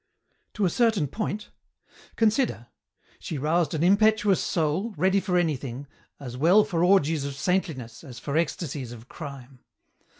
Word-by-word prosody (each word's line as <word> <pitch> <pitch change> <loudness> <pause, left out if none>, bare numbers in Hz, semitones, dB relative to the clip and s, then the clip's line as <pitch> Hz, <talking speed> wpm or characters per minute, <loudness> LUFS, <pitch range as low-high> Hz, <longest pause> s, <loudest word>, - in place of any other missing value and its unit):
"To 210 - +1
a - - +3
certain 225 -8 +2
point. 210 - -4 0.6
Consider. 220 - +1 0.5
She 155 - -5
roused 155 +2 +1
an 155 - 0
impetuous 205 +1 +4
soul, 175 +7 -1
ready 190 +5 +3
for 185 -2 0
anything, 140 -6 -2 0.3
as 125 -3 -7
well 175 +10 +5
for 170 -4 -1
orgies 165 -5 +3
of 140 -1 -4
saintliness 150 -8 -2
as 130 -6 -10
for 140 +3 -4
ecstasies 145 -6 -2
of 115 0 -12
crime. 135 -5 -9
165 Hz, 140 wpm, -26 LUFS, 140-195 Hz, 0.6 s, well